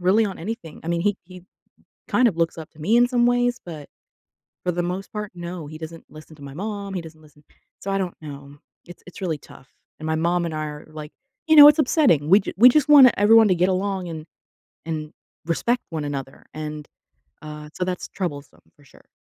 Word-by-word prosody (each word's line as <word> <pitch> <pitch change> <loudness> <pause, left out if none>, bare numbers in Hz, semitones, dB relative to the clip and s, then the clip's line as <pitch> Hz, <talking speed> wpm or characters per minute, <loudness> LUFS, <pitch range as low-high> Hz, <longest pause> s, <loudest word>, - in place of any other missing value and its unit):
really 195 +5 +3
on 195 - -7
anything. 170 -4 -7
I - - -5
mean, 170 0 0
he 205 +1 +1
he 180 0 -13 0.7
kind 250 - +3
of 170 - -9
looks 165 0 0
up 160 -1 -9
to 155 - -21
me 205 +9 +1
in 245 - +5
some 240 -2 +2
ways, 245 0 +1
but 155 -5 -9 0.8
for 180 - 0
the 175 - -2
most 180 +3 -5
part, 210 -1 -5
no, 175 -2 -7
he 155 - -9
doesn't 160 +1 -9
listen 155 0 -14
to 145 - -16
my 140 0 -9
mom, 200 +1 -5
he 185 - -2
doesn't 160 -1 -13
listen 150 -1 -21 0.4
so 195 - -5
I 195 - 0
don't 185 -2 -3
know. 140 -1 -10 0.3
It's 175 - -13
it's 180 - -12
really 170 -5 -2
tough, 135 -1 -17 0.3
and 155 - -6
my 160 0 0
mom 170 +2 0
and 165 - -4
I 155 - -3
are, 150 0 -9
like 155 -1 -9 0.3
you 315 - +4
know, 295 0 +12
it's 295 - +4
upsetting. 250 - +2
We 195 - +7
ju - - -6
we 240 +5 +8
just 295 +2 +2
wanna 275 -4 +8
everyone 220 +2 +6
to 185 - +3
get 180 +2 +1
along 190 -1 -2
and 160 -2 -7 0.6
and 155 -2 -5 0.3
respect 235 +9 -1
one 160 -3 -4
another, 135 -2 -6
and 150 -1 -6 0.6
uh, 150 0 -9
so - - -3
that's 180 -1 -4
troublesome 150 -7 -6
for 145 - -23
sure. - - -21
175 Hz, 220 wpm, -22 LUFS, 155-205 Hz, 0.8 s, know